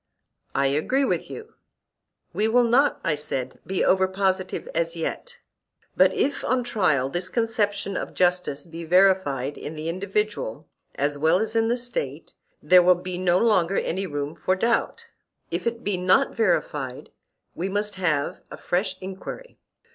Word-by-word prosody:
I 140 - +2
agree 155 - +1
with - - -1
you. 445 -1 -9 0.8
We 215 - +1
will 245 +2 +4
not, 245 +5 +3
I 165 - +1
said, 135 -3 -3
be 190 -1 0
over 190 0 +4
positive 190 -1 -1
as 165 0 -1
yet; 480 - -5 0.6
but - - +5
if, 285 - -1
on 255 -1 +1
trial, 180 - +1
this 175 +6 -3
conception 210 -3 -1
of - - -4
justice 180 -5 +1
be 165 0 -8
verified 165 -6 +2
in 155 - -6
the 155 +1 -4
individual 190 - -2 0.3
as 145 +1 -1
well 160 +4 +4
as 220 +2 -1
in 225 0 +3
the 240 +2 +1
State, 245 - -4 0.3
there 180 0 +7
will 180 +1 +5
be 180 0 -5
no 180 -1 +3
longer 195 -4 +2
any 190 +3 -1
room 145 -1 -4
for 185 +2 0
doubt; 235 - 0 0.5
if - - -2
it 235 0 -3
be 200 -2 0
not 185 +10 +3
verified, 150 - -1 0.4
we 185 +3 -3
must 205 +1 -1
have 160 -7 -1
a - - -9
fresh 185 +2 -1
enquiry. 195 - -8
185 Hz, 160 wpm, -24 LUFS, 165-215 Hz, 0.8 s, there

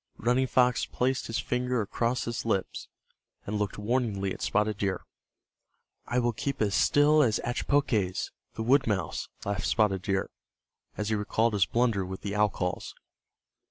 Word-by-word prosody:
Running 125 +3 +2
Fox 125 -1 +2
placed 130 +1 -1
his 115 - -2
finger 125 +1 -1
across 115 +3 -1
his 120 0 -3
lips, 100 -5 -2 0.6
and 105 +1 -2
looked 105 -3 -2
warningly 105 -4 -1
at - - -10
Spotted 105 -1 0
Deer. 100 -2 -1 1.0
"I 120 - -1
will 120 -1 +2
keep 140 +5 -3
as 105 -2 +1
still 150 +6 +4
as 115 -7 +2
Achpoques, 120 -7 0 0.2
the 110 - -3
wood 135 +3 +3
mouse," 95 -7 -1 0.2
laughed 100 -1 -1
Spotted 105 -4 +2
Deer, 95 0 -1 0.7
as 105 0 -2
he 110 - +1
recalled 110 +2 +1
his 95 -4 +3
blunder 115 -5 +1
with 95 +1 -6
the 100 - -4
owl 105 0 +4
calls. 90 -2 -4
110 Hz, 160 wpm, -28 LUFS, 100-125 Hz, 1.0 s, still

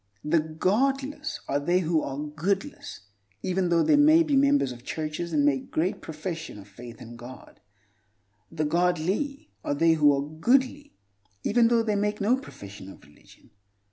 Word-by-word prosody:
The 160 +2 +2
"godless" 270 - -1
are 140 - 0
they 175 +6 +1
who 160 -2 +1
are 135 0 -5
goodless, 160 - -3 0.4
even 185 -1 0
though 170 -1 +3
they 290 - +4
may 310 +3 +6
be 300 -3 0
members 280 - +3
of 120 0 -11
churches 155 +4 -4
and 145 -2 +2
make 135 -2 +2
a - - -14
great 175 +4 -2
profession 160 - -6
of 100 -1 -12
faith 115 +3 -12
in 120 0 -10
God. 120 +2 -12 0.9
The 155 -2 -2
"godly" 180 - -1
are 145 - -1
they 165 +2 +4
who 150 -2 +5
are 140 +1 -3
goodly 260 - 0 0.5
even 240 -1 +3
though 230 -1 +3
they 215 -2 0
make 210 +1 -1
no 215 +5 +3
profession 100 - -10
of - - -14
religion. - - -21
170 Hz, 170 wpm, -26 LUFS, 150-240 Hz, 0.9 s, may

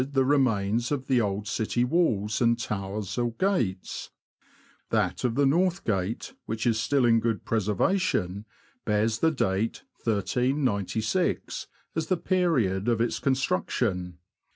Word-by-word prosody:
the 135 -1 +3
remains 120 -4 +2
of 135 -3 -1
the 130 -3 +3
old 105 0 -2
city 115 +3 0
walls 115 - +1
and 115 -1 +4
towers 105 -1 -4
or 120 -1 0
gates; 115 - -1 0.8
that - - 0
of 120 -2 +1
the 140 +1 +3
North 175 +6 +2
Gate, 100 +1 -2
which 110 0 -3
is 115 -2 +2
still 135 +3 +2
in 115 -1 +5
good 115 -2 -1
preser 105 -2 0
vation, 105 - 0 0.4
bears 110 +1 +1
the 160 - +4
date 110 -7 -1 0.2
1396 115 - 0 0.3
as 160 -1 -1
the 185 - +1
period 135 - +1
of 115 -2 +2
its 115 0 0
construction. 90 - 0
115 Hz, 135 wpm, -27 LUFS, 105-135 Hz, 0.8 s, in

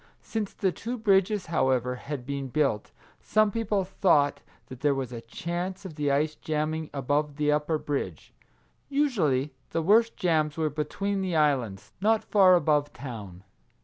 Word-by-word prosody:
Since 215 -3 -4
the 190 - +1
two 235 +7 -5
bridges, 200 -2 +2
however, 130 -6 +1
had 140 -2 -6
been 140 0 -3
built, 135 -6 0 0.3
some 215 -1 +2
people 210 -3 0
thought 145 -7 +2 0.2
that 130 -2 -10
there 145 0 +2
was 130 -2 -3
a 120 -2 -6
chance 175 - -5
of 180 - -6
the 150 -1 -1
ice 150 +3 +1
jamming 155 0 -2
above 145 +2 -1
the 150 0 +1
upper 150 +2 +1
bridge. 145 -2 -4 0.6
Usually 175 - +1 0.2
the 165 - -1
worst 225 +6 +4
jams 155 -4 +1
were 155 -2 0
between 195 +7 -2
the 185 -3 -1
islands, 130 -10 0
not 220 +2 +3
far 190 -3 +6
above 150 -4 +2
town. 105 -9 -8
155 Hz, 155 wpm, -27 LUFS, 140-190 Hz, 0.6 s, far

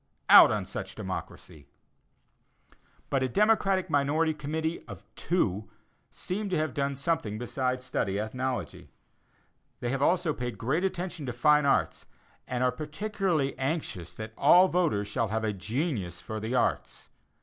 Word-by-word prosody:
Out - - +10
on - - -1
such - - -6
"democracy." 75 -5 -7 1.4
But 135 - +1
a 130 - 0
Democratic 195 - +2
minority 150 +3 +1
committee 160 +2 -3
(of 100 -2 -10
two) 110 - -1 0.4
seem 200 +3 -4
to 185 - 0
have 155 0 -1
done 140 0 -1
something 140 -7 -1
besides 125 +2 -2
study 100 -6 -1
ethnology. 120 - -4 0.9
They 120 - -2
have 135 0 -2
also 170 +1 +2
paid 120 -5 -5
great 135 - -1
attention 180 -5 -3
to 125 - -3
fine 150 +3 +4
arts, 135 - 0 0.4
and 125 0 -1
are 125 - +3
particularly 155 - -2
anxious 135 - -3
that 110 0 -7
all 180 +6 +6
voters 155 - +1
shall 110 +2 -1
have 110 +2 -2
a 110 -1 0
"genius 105 - -3
for 110 0 -6
the 110 +4 -3
arts." - - -1
135 Hz, 145 wpm, -28 LUFS, 110-165 Hz, 1.4 s, Out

